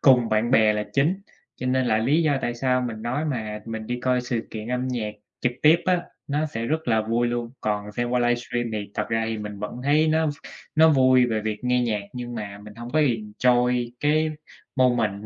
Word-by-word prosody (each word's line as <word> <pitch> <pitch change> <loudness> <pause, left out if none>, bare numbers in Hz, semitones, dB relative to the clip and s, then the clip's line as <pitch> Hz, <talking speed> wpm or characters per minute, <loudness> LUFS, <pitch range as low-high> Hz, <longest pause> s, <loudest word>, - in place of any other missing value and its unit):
cùng 125 -4 +5
bạn 110 +2 +1
bè 110 -4 +5
là 105 0 -2
chính, 165 +8 +2 0.4
cho 130 - -5
nên 130 0 +1
là 110 -1 +2
lý 140 +9 +2
do 145 -4 +2
tại 120 - -1
sao 125 +1 +1
mình 115 -3 -4
nói 130 +6 -1
mà 110 -7 -3
mình 110 -1 -5
đi 125 0 -3
coi 125 0 +1
sự 120 -2 -3
kiện 110 +1 -6
âm 125 +1 -1
nhạc 110 -4 -3 0.3
trực 125 - +1
tiếp 155 +2 +7
á, 180 -1 +3 0.3
nó 150 +2 0
sẽ 115 -5 -4
rất 160 0 -2
là 110 -1 +3
vui 115 +2 +1
luôn. 120 -1 -3
Còn 105 -1 -2
xem 120 +2 -2
qua 125 - +2
livestream 120 0 0
thì 105 -2 -4
thật 105 - -2
ra 115 0 0
thì 110 -1 -3
mình 105 -1 -6
vẫn 105 +3 -5
thấy 150 +3 +3
nó 160 0 +2 0.5
nó 160 +1 +6
vui 130 -3 +5
về 110 -2 -1
việc 110 +2 -4
nghe 125 0 +2
nhạc 105 -4 -1
nhưng 120 -1 -6
mà 100 -2 -6
mình 105 -1 -11
hông 120 +1 -8
có 155 - +2
enjoy 120 0 +1
cái 155 +1 +2 0.5
moment 115 -5 +2
120 Hz, 225 wpm, -24 LUFS, 110-130 Hz, 0.5 s, tiếp